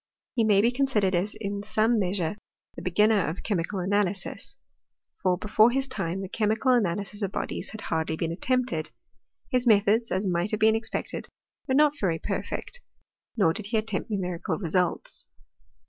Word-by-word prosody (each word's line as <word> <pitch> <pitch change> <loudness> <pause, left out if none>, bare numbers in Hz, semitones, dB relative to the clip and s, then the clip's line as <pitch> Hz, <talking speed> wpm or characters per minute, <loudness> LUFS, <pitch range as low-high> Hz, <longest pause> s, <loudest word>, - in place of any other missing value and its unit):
He 235 - +2
may 205 -2 +5
be 235 +3 +3
considered 245 -8 +1
as 185 +4 0
in 200 -1 -3
some 215 +2 +2
measure 185 -2 -1 0.4
the - - -7
beginner 210 +2 +3
of 160 +5 -4
chemical 195 -1 -1
analysis; 195 0 -1 0.6
for, 185 -3 +2
before 215 +3 +4
his 270 +2 0
time, 195 -7 -3
the 195 - -4
chemical 220 +5 +1
analysis 205 -2 0
of 195 -2 -1
bodies - - -3
had 220 - -8
hardly 160 0 -1
been 165 0 -1
attempted. 220 -4 0 0.6
His 250 -1 +1
methods, 220 +2 +4
as 190 +2 0
might 175 +1 +1
have 215 - 0
been 220 0 +5
expected, 225 0 -3 0.4
were 260 - +1
not 295 0 +4
very 175 -5 +1
perfect; 485 - -3 0.6
nor 185 -6 +4
did 200 +2 -4
he 225 +1 0
attempt 215 -1 -2
numerical 180 -5 -2
results. 180 - -1
205 Hz, 160 wpm, -27 LUFS, 180-225 Hz, 0.6 s, may